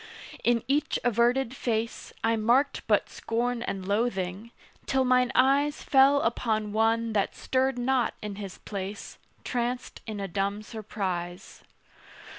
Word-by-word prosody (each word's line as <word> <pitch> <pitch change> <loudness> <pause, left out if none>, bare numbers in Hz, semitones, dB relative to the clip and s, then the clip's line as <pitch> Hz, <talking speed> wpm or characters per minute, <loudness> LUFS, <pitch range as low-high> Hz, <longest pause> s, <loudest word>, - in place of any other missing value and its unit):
In 235 -1 +2
each 285 +3 +1
averted 245 +2 +2
face 230 -3 -2
I 225 0 +3
marked 240 +6 +2
but - - +3
scorn 240 +1 -2
and 195 -5 -4
loathing, 200 -1 -1 0.4
till 265 -1 +2
mine 250 0 +3
eyes 280 +3 +3
Fell 275 +1 +5
upon 220 -2 0
one 225 +1 +2
that 200 -2 0
stirred 265 0 0
not 250 0 +1
in 210 -2 -6
his 200 -3 -7
place, 200 0 -6 0.2
Tranced 245 0 -3
in 215 -2 -4
a 195 - -3
dumb 200 +3 -2
surprise. 190 -5 -5
230 Hz, 130 wpm, -28 LUFS, 205-250 Hz, 0.4 s, Fell